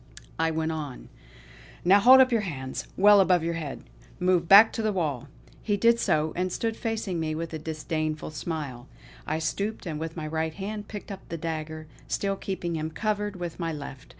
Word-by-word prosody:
I 165 Hz, 0 st, +2 dB
went 160 Hz, 0 st, -1 dB
on: 150 Hz, -5 st, -6 dB, 0.8 s
"Now 195 Hz, +3 st, +7 dB
hold 255 Hz, +5 st, +8 dB
up 255 Hz, -1 st, +4 dB
your 230 Hz, -2 st, +2 dB
hands, 130 Hz, -9 st, -5 dB
well 205 Hz, +1 st, +7 dB
above 180 Hz, -3 st, +4 dB
your 170 Hz, +1 st, -1 dB
head! 155 Hz, -4 st, -5 dB, 0.4 s
Move 180 Hz, -2 st, +2 dB
back 205 Hz, +4 st, +9 dB
to -, -, -2 dB
the 215 Hz, -1 st, +1 dB
wall!" 150 Hz, -9 st, -2 dB, 0.3 s
He 205 Hz, -2 st, 0 dB
did 230 Hz, +3 st, +4 dB
so, 155 Hz, -5 st, +1 dB
and 185 Hz, +1 st, -1 dB
stood 225 Hz, +4 st, -2 dB
facing 220 Hz, -7 st, -3 dB
me 155 Hz, -1 st, -2 dB
with 165 Hz, +1 st, -5 dB
a 160 Hz, -, -3 dB
disdainful 155 Hz, 0 st, -3 dB
smile. 145 Hz, -5 st, -5 dB, 0.4 s
I 155 Hz, -, 0 dB
stooped, 200 Hz, +8 st, -3 dB
and 155 Hz, -3 st, -4 dB
with 160 Hz, +1 st, -5 dB
my 155 Hz, -, -4 dB
right 160 Hz, +1 st, -2 dB
hand 205 Hz, +1 st, -5 dB
picked 210 Hz, 0 st, -8 dB
up 195 Hz, -1 st, -9 dB
the 165 Hz, -, -4 dB
dagger, 155 Hz, -1 st, -5 dB, 0.2 s
still 195 Hz, -1 st, -1 dB
keeping 180 Hz, -3 st, -4 dB
him 155 Hz, 0 st, -2 dB
covered 210 Hz, +3 st, -2 dB
with 175 Hz, -2 st, -6 dB
my 165 Hz, -1 st, -1 dB
left. 140 Hz, -2 st, -8 dB
165 Hz, 195 wpm, -27 LUFS, 155-200 Hz, 0.8 s, back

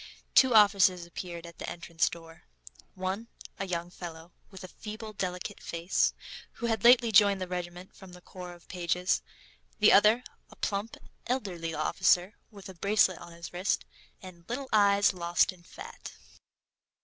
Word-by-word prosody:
Two 260 Hz, -3 st, +6 dB
officers 195 Hz, -4 st, +5 dB
appeared 170 Hz, 0 st, -7 dB
at 170 Hz, -1 st, -13 dB
the -, -, -5 dB
entrance 170 Hz, -1 st, -1 dB
door: 165 Hz, -1 st, -12 dB, 0.5 s
one, 190 Hz, +5 st, -3 dB, 0.3 s
a 195 Hz, -, -3 dB
young 175 Hz, -1 st, -3 dB
fellow, 170 Hz, -1 st, -9 dB, 0.2 s
with 190 Hz, -1 st, -11 dB
a -, -, -7 dB
feeble, 215 Hz, +3 st, -9 dB
delicate 185 Hz, +1 st, -5 dB
face, 170 Hz, +2 st, 0 dB, 0.4 s
who 235 Hz, -, -6 dB
had 225 Hz, -1 st, -1 dB
lately 240 Hz, -1 st, +6 dB
joined 200 Hz, -2 st, +5 dB
the 185 Hz, -, -4 dB
regiment 180 Hz, 0 st, -6 dB
from 190 Hz, -2 st, -13 dB
the 180 Hz, -, -11 dB
Corps 180 Hz, -1 st, -10 dB
of 175 Hz, -1 st, -18 dB
Pages; 180 Hz, +1 st, 0 dB, 0.6 s
the 215 Hz, -, +6 dB
other, 215 Hz, +5 st, +5 dB, 0.3 s
a -, -, -15 dB
plump, 205 Hz, +2 st, -3 dB, 0.3 s
elderly 180 Hz, -10 st, -3 dB
officer, 175 Hz, +5 st, +2 dB, 0.2 s
with 205 Hz, -3 st, -12 dB
a 190 Hz, -, -9 dB
bracelet 195 Hz, 0 st, +2 dB
on 175 Hz, -, -11 dB
his 170 Hz, +1 st, -10 dB
wrist, 185 Hz, +3 st, -1 dB, 0.4 s
and 180 Hz, -2 st, -12 dB
little 260 Hz, +2 st, -4 dB
eyes, 200 Hz, -1 st, +4 dB
lost 175 Hz, 0 st, +1 dB
in 180 Hz, -, -19 dB
fat. 170 Hz, -, -11 dB
185 Hz, 160 wpm, -29 LUFS, 175-205 Hz, 0.6 s, Two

